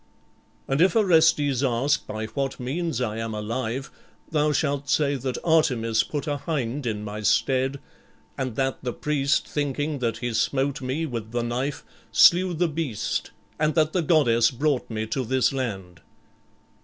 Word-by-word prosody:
_' - - -38 0.6
And 135 +3 +1
if 190 +5 +4
Orestes 160 - +4
ask 130 +2 +1
by 110 +1 -4
what 135 +4 -3
means 145 +3 -2
I 110 -3 -2
am 115 -1 -3
alive, 115 +4 -3 0.4
thou 150 -1 +2
shalt 140 0 -1
say 145 -2 +2
that 130 0 -3
Artemis 125 -9 +2
put 145 +3 -4
a 145 -2 -1
hind 140 -4 -3
in 105 -2 -2
my 105 +1 -5
stead, 135 +5 +1 0.6
and 130 -4 -3
that 135 0 -1
the 125 -2 -2
priest, 140 -1 0
thinking 145 0 -2
that 115 -3 -1
he 120 0 -3
smote 135 +4 0
me 130 +6 -2
with 115 -6 -5
the 120 -1 0
knife, 125 +4 -2 0.3
slew 180 0 +5
the 175 +2 +2
beast, 150 -8 -3 0.3
and 155 0 +1
that 155 -1 +2
the 180 - +2
goddess 120 -8 +4
brought 140 +1 -1
me 110 -1 -3
to 130 +4 -2
this 130 +2 +1
land." 95 -10 -4
135 Hz, 165 wpm, -25 LUFS, 115-150 Hz, 0.6 s, slew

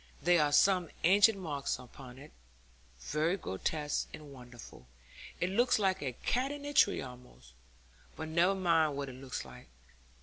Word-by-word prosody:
There 175 -1 +3
are 145 - 0
some 180 +1 +3
ancient 200 +4 +5
marks 150 -7 -3
upon 125 0 -13
it, 140 +3 -13 0.7
very 155 - 0
grotesque 145 - -3
and 150 -2 -12
wonderful; 120 - -13 0.5
it 180 +1 -1
looks 240 +5 +3
like 195 -3 0
a 130 -3 -3
cat 255 - -1
in 290 0 -7
a 290 - -5
tree 205 -8 +3
almost, 125 - -13 0.6
but 160 - -6
never 175 +4 +3
mind 165 -6 +2
what 140 -1 -4
it - - -9
looks 130 - -6
like. 60 -1 -13
155 Hz, 160 wpm, -32 LUFS, 130-190 Hz, 0.7 s, ancient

